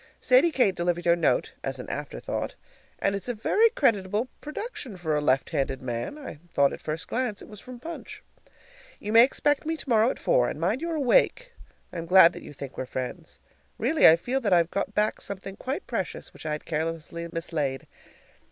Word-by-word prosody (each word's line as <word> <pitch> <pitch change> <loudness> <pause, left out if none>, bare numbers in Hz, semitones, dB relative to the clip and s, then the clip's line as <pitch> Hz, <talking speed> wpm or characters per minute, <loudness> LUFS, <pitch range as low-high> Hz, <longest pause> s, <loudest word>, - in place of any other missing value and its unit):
Sadie - - +5
Kate 250 - +2
delivered 175 0 -1
your 170 0 +5
note 170 -2 +1
(as 135 0 -3
an 125 - -8
afterthought). 145 0 -4 0.4
And 195 - 0
it's 200 +4 -3
a 245 - -1
very 435 - +3
creditable 220 - +1
production 300 - -6
for 160 -3 -1
a 150 - +1
left 135 -2 +1
handed 135 -1 -1
man; 120 - -4
I 275 - -9
thought 140 0 +3
at - - -8
first 155 +1 -4
glance 245 -4 -2
it - - -12
was 210 -2 -11
from 250 +2 -11
Punch. 330 +6 -8 0.8
You 210 +1 -4
may 230 +1 +9
expect 290 +2 +1
me 320 +1 -2
tomorrow 230 -5 +2
at - - -3
four, 125 - +2
and - - -6
mind 195 - 0
you're 335 -1 -2
awake! - - +2 0.4
I'm 170 -1 -5
glad 180 -1 +8
that - - -9
you - - -10
think 140 -2 -8
we're 130 - -3
friends. 130 0 -6 0.4
Really, 285 +8 +5
I 160 - +9
feel 250 +10 -2
that 205 -6 +2
I've 170 -1 +3
got 200 +1 -2
back 210 +1 +1
something 195 0 -6
quite 270 - -4
precious - - -4
which - - -9
I 155 - -1
had 150 - -5
carelessly 165 +1 -3
mislaid. 155 -5 -3
195 Hz, 200 wpm, -26 LUFS, 160-255 Hz, 0.8 s, may